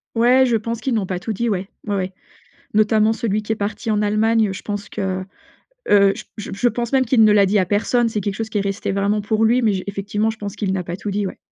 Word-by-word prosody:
Ouais, 250 Hz, +3 st, +5 dB
je 235 Hz, -3 st, +2 dB
pense 230 Hz, +1 st, -4 dB
qu'ils 255 Hz, +2 st, -2 dB
n'ont 205 Hz, -4 st, 0 dB
pas 180 Hz, -1 st, -3 dB
tout 220 Hz, +4 st, -4 dB
dit, 235 Hz, +3 st, -1 dB
ouais. 190 Hz, -1 st, -2 dB, 0.2 s
Ouais, 205 Hz, -, 0 dB
ouais. 190 Hz, -1 st, -2 dB, 0.6 s
Notamment 215 Hz, +1 st, +3 dB
celui 215 Hz, -2 st, -1 dB
qui 215 Hz, -, -4 dB
est 220 Hz, -, +1 dB
parti 215 Hz, +2 st, -3 dB
en 210 Hz, -, +1 dB
Allemagne, 215 Hz, 0 st, +2 dB
je 190 Hz, -, -7 dB
pense 205 Hz, 0 st, -5 dB
que, 190 Hz, -1 st, -3 dB, 0.7 s
heu, 200 Hz, -1 st, +6 dB
j -, -, -9 dB
j 210 Hz, -, -6 dB
je 240 Hz, +5 st, +2 dB
pense 235 Hz, +2 st, -3 dB
même 260 Hz, -1 st, +4 dB
qu'il 230 Hz, -2 st, +4 dB
ne 215 Hz, -, +6 dB
l'a 205 Hz, -1 st, +5 dB
dit 200 Hz, +2 st, +2 dB
à 185 Hz, -, +2 dB
personne. 230 Hz, +4 st, +1 dB
C'est 215 Hz, -3 st, -3 dB
quelque 200 Hz, 0 st, -2 dB
chose 225 Hz, -1 st, -3 dB
qui 215 Hz, -, -6 dB
est -, -, +1 dB
resté 200 Hz, 0 st, -3 dB
vraiment 200 Hz, +2 st, +1 dB
pour 215 Hz, +2 st, 0 dB
lui, 240 Hz, +3 st, +4 dB
mais 215 Hz, -4 st, +2 dB
j 185 Hz, -, -3 dB
effectivement 205 Hz, +2 st, -1 dB
je 220 Hz, -, -9 dB
pense 205 Hz, 0 st, -6 dB
qu'il 200 Hz, -2 st, -1 dB
n'a 190 Hz, -, -1 dB
pas 175 Hz, 0 st, -5 dB
tout 205 Hz, +2 st, -5 dB
dit 205 Hz, 0 st, -1 dB
ouais. -, -, -7 dB
210 Hz, 275 wpm, -20 LUFS, 200-225 Hz, 0.7 s, heu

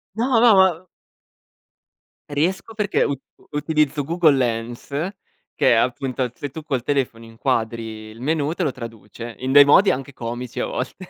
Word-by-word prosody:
No, 240 Hz, +1 st, +2 dB
no, 235 Hz, -2 st, +7 dB
ma 185 Hz, -2 st, +3 dB, 1.4 s
Riesco 170 Hz, +9 st, -1 dB
perché 210 Hz, -2 st, +1 dB
ut 140 Hz, -2 st, -2 dB, 0.3 s
utilizzo 150 Hz, -1 st, 0 dB
Google 160 Hz, 0 st, +3 dB
Lens 120 Hz, -2 st, -2 dB, 0.7 s
che -, -, +3 dB
è -, -, +6 dB
appunto 125 Hz, +1 st, 0 dB
se 145 Hz, -, -5 dB
tu 160 Hz, +4 st, -8 dB
col 140 Hz, -6 st, -2 dB
telefono 130 Hz, -5 st, -1 dB
inquadri 115 Hz, -2 st, -3 dB
il 110 Hz, +1 st, -13 dB
menù, 150 Hz, +3 st, 0 dB
te -, -, -2 dB
lo 145 Hz, -, +1 dB
traduce 115 Hz, 0 st, -9 dB
in 130 Hz, +1 st, -2 dB
dei 145 Hz, 0 st, +10 dB
modi 165 Hz, +8 st, +6 dB
anche 135 Hz, +1 st, -4 dB
comici 120 Hz, 0 st, -6 dB
a -, -, 0 dB
volte. 125 Hz, -, -4 dB
135 Hz, 155 wpm, -22 LUFS, 120-155 Hz, 1.4 s, dei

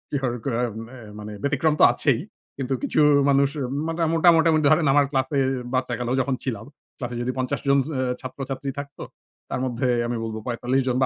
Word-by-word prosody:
অ্যা 125 Hz, -2 st, -1 dB, 0.6 s
মানে 105 Hz, 0 st, -7 dB
ব্যতিক্রম 140 Hz, +2 st, +2 dB
তো -, -, +6 dB
আছেই। -, -, +1 dB, 0.4 s
কিন্তু 135 Hz, -1 st, -2 dB
কিছু -, -, +1 dB, 0.3 s
মানুষ 140 Hz, 0 st, +4 dB, 0.4 s
মাটা 165 Hz, +1 st, -1 dB
মোটা 165 Hz, +1 st, +5 dB
মোটামুটি 160 Hz, -1 st, +3 dB
ধরেন 155 Hz, +1 st, +4 dB
আমার 145 Hz, -1 st, +5 dB
ক্লাসে 135 Hz, +1 st, 0 dB, 0.3 s
বাচ্চাকালেও 125 Hz, -1 st, -1 dB
যখন 130 Hz, +1 st, -1 dB
ছিলাম। 110 Hz, -5 st, -4 dB, 0.3 s
ক্লাসে 125 Hz, -1 st, -5 dB
যদি 125 Hz, +1 st, -1 dB
৫০ 130 Hz, -1 st, -1 dB
জন 140 Hz, 0 st, +5 dB
স -, -, -8 dB
অ্যা 130 Hz, -, 0 dB, 0.2 s
ছাত্রছাত্রী 135 Hz, +1 st, -5 dB
থাকতো 140 Hz, 0 st, -8 dB, 0.5 s
তার -, -, -2 dB
মধ্যে 125 Hz, 0 st, -1 dB, 0.2 s
আমি 120 Hz, -, -2 dB
বলব 110 Hz, -1 st, -4 dB
৪৫ 125 Hz, +2 st, 0 dB
জন 125 Hz, -, +1 dB
বা -, -, +5 dB
130 Hz, 175 wpm, -24 LUFS, 125-140 Hz, 0.6 s, তো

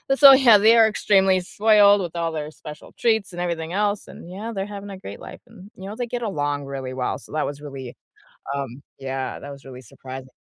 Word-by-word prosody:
so, 275 Hz, -1 st, +9 dB
yeah, 250 Hz, -5 st, +7 dB
they 220 Hz, +3 st, +5 dB
are 225 Hz, -, +7 dB
extremely 195 Hz, -3 st, +3 dB
spoiled 205 Hz, +1 st, +4 dB
with 175 Hz, -2 st, -6 dB
all 165 Hz, -1 st, -1 dB
their 150 Hz, -1 st, -5 dB
special 150 Hz, -1 st, -12 dB
treats 220 Hz, -5 st, +1 dB
and 175 Hz, -, -5 dB
everything 170 Hz, -1 st, -3 dB
else, 205 Hz, +1 st, -1 dB
and 170 Hz, -, -12 dB
yeah, 205 Hz, +5 st, -6 dB
they're 195 Hz, -1 st, -3 dB
having 205 Hz, 0 st, -8 dB
a 195 Hz, -, -8 dB
great 100 Hz, -, -9 dB
life, -, -, -11 dB
and 205 Hz, -4 st, -15 dB
you 190 Hz, -, -9 dB
know, 210 Hz, -, -7 dB
they 245 Hz, -1 st, -3 dB
get 240 Hz, +1 st, -4 dB
along 145 Hz, -9 st, -2 dB
really 135 Hz, -2 st, -6 dB
well, 130 Hz, -1 st, -2 dB
so -, -, -16 dB
that 155 Hz, -, 0 dB
was 145 Hz, 0 st, -6 dB
really, 135 Hz, -4 st, -8 dB, 0.6 s
um, 135 Hz, -1 st, -5 dB, 0.2 s
yeah, 135 Hz, -1 st, -4 dB
that 145 Hz, -, -9 dB
was 140 Hz, -1 st, -11 dB
really 130 Hz, -1 st, -11 dB
surprising. 130 Hz, +2 st, -10 dB
180 Hz, 225 wpm, -22 LUFS, 140-210 Hz, 0.6 s, so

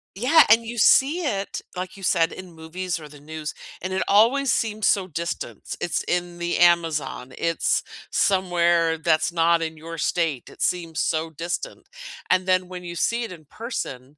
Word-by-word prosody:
Yeah, 260 Hz, +10 st, +6 dB
and 225 Hz, +1 st, +6 dB
you 235 Hz, +1 st, -6 dB
see 275 Hz, -, +5 dB
it 200 Hz, -7 st, -2 dB
like 185 Hz, +1 st, -5 dB
you 195 Hz, -, -12 dB
said, 170 Hz, -2 st, +2 dB
in 185 Hz, -2 st, -10 dB
movies 165 Hz, +2 st, -4 dB
or 155 Hz, -, -10 dB
the 145 Hz, 0 st, -14 dB
news, 155 Hz, 0 st, -6 dB, 0.3 s
and 185 Hz, +1 st, -4 dB
it 190 Hz, -, 0 dB
always 240 Hz, +7 st, +4 dB
seems 215 Hz, -2 st, 0 dB
so 190 Hz, -2 st, +2 dB
distant. 170 Hz, 0 st, -5 dB
It's 175 Hz, -, -1 dB
in 175 Hz, -1 st, -2 dB
the 175 Hz, 0 st, -1 dB
Amazon, 165 Hz, -7 st, +2 dB
it's 165 Hz, 0 st, +1 dB, 0.3 s
somewhere 175 Hz, -3 st, +2 dB
that's 155 Hz, +1 st, +1 dB
not 170 Hz, 0 st, +3 dB
in 160 Hz, -1 st, -4 dB
your 165 Hz, +2 st, -8 dB
state. 160 Hz, -4 st, -1 dB
It -, -, -14 dB
seems 165 Hz, -3 st, -1 dB
so 160 Hz, 0 st, 0 dB
distant. 170 Hz, -, -5 dB, 0.4 s
And 185 Hz, 0 st, +3 dB
then 185 Hz, -1 st, +2 dB
when 180 Hz, -1 st, -8 dB
you 170 Hz, 0 st, -7 dB
see 235 Hz, +7 st, 0 dB
it 225 Hz, -, -6 dB
in 160 Hz, -3 st, -11 dB
person, 145 Hz, -, -6 dB
175 Hz, 180 wpm, -24 LUFS, 165-190 Hz, 0.4 s, Yeah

